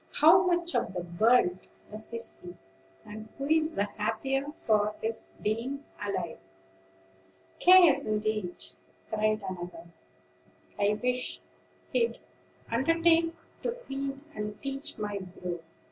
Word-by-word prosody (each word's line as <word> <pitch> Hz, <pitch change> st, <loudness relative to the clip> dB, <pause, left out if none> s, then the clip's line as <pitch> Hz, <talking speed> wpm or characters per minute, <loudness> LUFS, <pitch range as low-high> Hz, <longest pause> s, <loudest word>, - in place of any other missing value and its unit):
How 330 Hz, +5 st, +7 dB
much 345 Hz, -1 st, +1 dB
of -, -, 0 dB
the 180 Hz, -2 st, -3 dB, 0.2 s
world 220 Hz, -5 st, +5 dB, 0.3 s
does 215 Hz, +1 st, -4 dB
he 230 Hz, -, -4 dB
see, 180 Hz, -6 st, -4 dB, 0.5 s
and 215 Hz, +1 st, -9 dB
who 275 Hz, -, -3 dB
is 315 Hz, +2 st, +2 dB
the 200 Hz, -, +2 dB
happier 225 Hz, +7 st, -1 dB
for 210 Hz, -7 st, +1 dB
his 225 Hz, 0 st, -3 dB
being 235 Hz, +7 st, -1 dB, 0.2 s
alive?" 185 Hz, -, -3 dB, 1.2 s
"Cares 345 Hz, -7 st, +7 dB
indeed!" 215 Hz, -3 st, -1 dB, 0.4 s
cried 215 Hz, -1 st, +1 dB
another; 175 Hz, -2 st, -7 dB, 0.9 s
"I 205 Hz, +1 st, +3 dB
wish 250 Hz, 0 st, 0 dB, 0.5 s
he'd 465 Hz, -1 st, +2 dB, 0.5 s
undertake 330 Hz, +6 st, +3 dB, 0.3 s
to -, -, 0 dB
feed 275 Hz, -, -5 dB
and 210 Hz, -2 st, -5 dB
teach 275 Hz, +1 st, -4 dB
my 205 Hz, -2 st, -3 dB
brood. 180 Hz, -2 st, -6 dB
225 Hz, 115 wpm, -29 LUFS, 210-280 Hz, 1.2 s, How